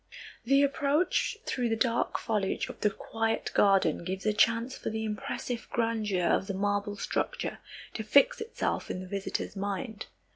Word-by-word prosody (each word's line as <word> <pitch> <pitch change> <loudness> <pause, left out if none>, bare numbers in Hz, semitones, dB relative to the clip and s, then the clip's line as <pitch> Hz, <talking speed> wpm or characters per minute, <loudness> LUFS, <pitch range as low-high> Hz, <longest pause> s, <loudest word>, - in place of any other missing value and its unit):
The 275 +3 +5
approach 285 +4 +1
through 245 -2 0
the 225 - +2
dark 230 +1 +1
foliage 210 -4 -1
of - - -9
the 210 - +3
quiet 225 +2 -2
garden 195 -6 +4
gives 190 +3 -4
a 215 - +3
chance 230 +4 +2
for - - -4
the 220 0 -3
impressive 235 +2 -4
grandeur 220 -6 0
of 190 - +2
the 195 - -2
marble 205 +1 0
structure - - -2 0.3
to 220 - -4
fix 280 - +4
itself 450 - -2
in - - -3
the 185 - -8
visitor's 195 +1 -3
mind. 205 +3 -4
220 Hz, 160 wpm, -29 LUFS, 200-240 Hz, 0.3 s, The